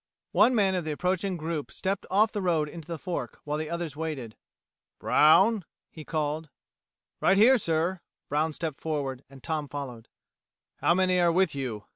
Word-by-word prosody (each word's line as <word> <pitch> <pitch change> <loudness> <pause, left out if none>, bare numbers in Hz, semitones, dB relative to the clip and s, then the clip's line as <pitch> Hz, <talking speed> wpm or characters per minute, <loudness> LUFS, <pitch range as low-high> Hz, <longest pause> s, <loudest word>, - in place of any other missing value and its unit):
One 255 - +4
man 195 -4 +3
of 180 -2 -1
the 155 - -3
approaching 185 +3 -1
group 160 -2 -4
stepped 195 +1 -3
off 215 +4 +3
the 205 - -3
road 165 -5 +1
into 160 0 -10
the 170 -1 -4
fork, 180 +3 -5
while 150 +1 -2
the 155 - -4
others 170 -4 -4
waited. 145 -8 -5 0.6
"Brown," 190 +7 +5 0.3
he 155 - -10
called. 155 0 -2 0.7
"Right 195 - +4
here, 245 +5 +6
sir." 170 0 0 0.3
Brown 155 +2 0
stepped 155 -2 -5
forward, 140 -4 -3
and 135 -1 -15
Tom 155 -2 -2
followed. 130 -6 -7 0.7
"How 170 - +3
many 185 -1 +2
are 175 -1 +4
with 180 -2 +2
you?" 125 -7 -4
160 Hz, 170 wpm, -27 LUFS, 150-185 Hz, 0.7 s, here